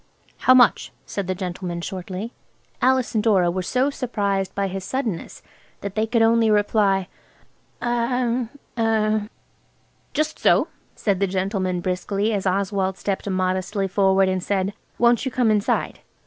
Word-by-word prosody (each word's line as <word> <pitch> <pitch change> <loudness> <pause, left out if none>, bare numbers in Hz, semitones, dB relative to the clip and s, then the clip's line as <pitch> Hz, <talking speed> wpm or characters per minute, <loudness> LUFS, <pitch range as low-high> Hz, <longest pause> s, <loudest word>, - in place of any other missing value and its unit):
"How 255 - +8
much?" 245 -2 +4
said 200 -3 -4
the 185 - -1
gentleman 180 -1 -4
shortly. 190 +5 -5 0.5
Alice 260 -1 +2
and 215 -2 +1
Dora 190 -6 +3
were 185 +1 -2
so 255 +9 +1
surprised 200 -8 -2
by 200 - 0
his 190 0 -5
suddenness 230 -5 -4 0.4
that 200 -1 -5
they 215 +1 0
could 230 0 +2
only 225 0 +4
reply– 205 -2 +2 0.8
"Er–er–" 235 -3 0 0.9
"Just 310 +1 -1
so," - - +3 0.3
said 200 -4 0
the 195 - +2
gentleman 185 -1 -1
briskly 195 +4 -1
as 200 -2 -1
Oswald 190 0 0
stepped 200 0 -3
modestly 185 +1 -1
forward 195 0 +3
and 185 0 0
said– 195 +1 -1 0.2
"Won't 235 0 +3
you 265 - -1
come 245 -3 +2
inside?" 210 -1 0
200 Hz, 140 wpm, -23 LUFS, 190-230 Hz, 0.9 s, How